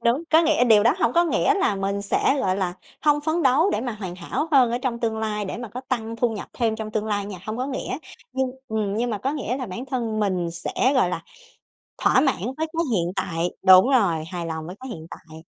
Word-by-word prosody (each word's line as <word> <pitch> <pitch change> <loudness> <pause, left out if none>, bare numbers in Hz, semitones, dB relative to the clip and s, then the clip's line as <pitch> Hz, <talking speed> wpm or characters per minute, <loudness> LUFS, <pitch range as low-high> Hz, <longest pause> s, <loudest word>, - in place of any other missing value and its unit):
đúng, 240 +6 +2
có 320 +1 +6
nghĩa 315 -6 +3
điều 220 -4 +6
đó 235 - +4
hông 235 - +2
có 345 +4 +4
nghĩa 375 +4 +2
là 385 - +1
mình 200 +1 -2
sẽ, 205 +7 +1
gọi 185 -4 +1
là, 185 -3 -1 0.3
hông 295 -1 +3
phấn 315 +3 0
đấu 285 +8 +4
để - - 0
mà 245 0 -3
hoàn 195 -5 -6
hảo 185 - -3
hơn 255 -4 +5
ở 240 - 0
trong 250 -2 -2
tương 225 -2 -1
lai 210 -1 -2
để 190 - -5
mà 240 0 -6
có 245 +5 -7
tăng 230 -3 -2
thu 240 +1 +2
nhập 215 -2 -6
thêm 225 -2 0
trong 220 -1 -5
tương 215 0 -1
lai 205 -2 -1
nha, 200 -3 -7
hông 215 +1 -3
có 255 +2 -2
nghĩa, 265 -1 -4 0.3
nhưng, 265 -1 0 0.2
ừm, 215 -3 -1
nhưng 240 +2 0
mà 210 - -2
có 265 +8 -1
nghĩa 275 -4 -2
là 260 -2 -4
bản 190 +7 -6
thân 235 -5 -2
mình 185 -4 0
sẽ, 175 +9 0
gọi 250 -9 +3
là, 165 -2 -3 0.8
thỏa - - +5
mãn 275 - +2 0.2
với 320 +1 -1
cái 335 +1 +1
hiện 175 -3 0
tại, 175 -2 -1 0.2
đúng 185 +5 +8
rồi, 195 - +2
hài 175 -2 -4
lòng 160 -1 -4
với 180 - -7
cái 260 +1 -8
hiện 160 -9 -8
tại. 160 -1 -12
220 Hz, 255 wpm, -24 LUFS, 195-260 Hz, 0.8 s, đúng